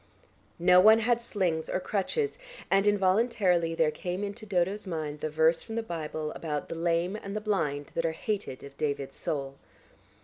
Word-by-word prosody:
No 180 +1 +6
one 215 +4 +8
had 235 +1 +1
slings 185 -9 -1
or - - 0
crutches, 420 - -1 0.3
and 195 +1 +4
involuntarily 190 -4 +2
there 160 -2 +3
came 180 +4 -4
into 205 +2 -6
Dodo's 195 +2 0
mind 155 -4 -4
the 155 - -2
verse 160 +2 +3
from 225 - -7
the 230 - -1
Bible 155 -4 -4
about 150 -3 -4
"the - - -3
lame 170 +3 0
and 200 -1 -6
the - - 0
blind 160 -9 -1
that 165 - -1
are 165 - +1
hated 195 -5 -4
of 140 0 -11
David's 140 -3 -2
soul." 140 -2 -3
180 Hz, 175 wpm, -29 LUFS, 160-205 Hz, 0.3 s, one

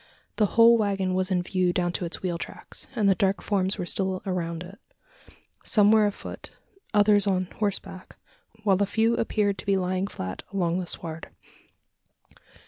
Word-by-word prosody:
The 210 - +3
whole 230 0 +7
waggon 195 -3 0
was 185 +1 0
in 180 -2 +1
view 185 -1 +1
down 175 -1 0
to 175 - -3
its 170 - -4
wheel 175 -2 -2
tracks; - - -5
and 215 -4 +2
the 195 - +6
dark 195 +1 +1
forms 195 -1 0
were 180 - -3
still 190 +1 -1
around 170 -3 -3
it. 190 +3 -12 0.8
Some 210 -2 +4
were 215 -1 +5
afoot, 205 - -7 0.4
others 205 -1 +4
on 185 -1 +1
horseback 195 -2 -4 0.5
while 195 -2 +3
a 200 - +2
few 225 +3 +2
appeared 205 -4 0
to - - -7
be 195 -1 +3
lying 185 +1 -1
flat 95 - -6
along 180 -3 0
the 180 - -4
sward. 165 -1 -6
190 Hz, 170 wpm, -26 LUFS, 180-205 Hz, 0.8 s, whole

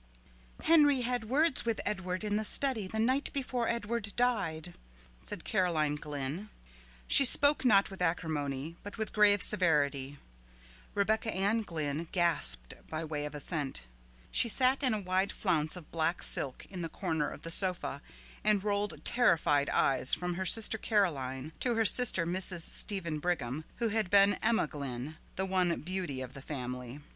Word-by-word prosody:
"Henry 295 -5 +5
had 245 -2 -2
words 300 +3 +2
with 230 -1 -1
Edward 185 -1 -2
in 210 -1 -1
the 215 - 0
study 230 -3 +1
the 220 - -5
night 260 +6 +1
before 250 -4 -1
Edward 230 -2 -2
died," 175 -9 0 0.5
said - - -5
Caroline 160 -5 +1
Glynn. 150 +6 -5 0.6
She - - +6
spoke 285 +3 +5
not 200 -6 +4
with 190 - -9
acrimony, 160 -3 -2
but 205 - -9
with 220 -1 -3
grave 205 -2 +5
severity. 145 -5 +1 0.8
Rebecca 220 +2 +1
Ann 200 +4 +1
Glynn 160 -4 -3
gasped 65 - 0 0.2
by 160 +1 -3
way 150 -1 -3
of 150 - -9
assent. 145 - -3 0.5
She 235 - +3
sat 260 +4 +2
in 255 -5 +2
a - - -2
wide 190 +1 0
flounce 160 -5 0
of 175 -4 -11
black 165 +1 -1
silk 135 -2 -3
in 185 -2 -5
the 165 - -3
corner 160 -4 -1
of - - -10
the 165 - -6
sofa, 180 -6 -1 0.4
and 210 -2 +3
rolled 205 -7 -2
terrified 160 - +3
eyes 130 -1 +2
from 180 0 -3
her 190 +1 -2
sister 220 +2 +2
Caroline 150 - 0
to 245 -2 0
her 225 0 +2
sister 210 -5 +2
Mrs. 180 0 0
Stephen 170 -3 -2
Brigham, 155 -4 -2
who 230 -1 0
had 215 -3 0
been 200 +1 +6
Emma 225 -3 +2
Glynn, 140 0 -6 0.2
the 190 - -1
one 185 -3 +1
beauty 175 -6 -3
of 130 0 -7
the 140 - -9
family. 125 -1 -6
180 Hz, 160 wpm, -31 LUFS, 150-215 Hz, 0.8 s, She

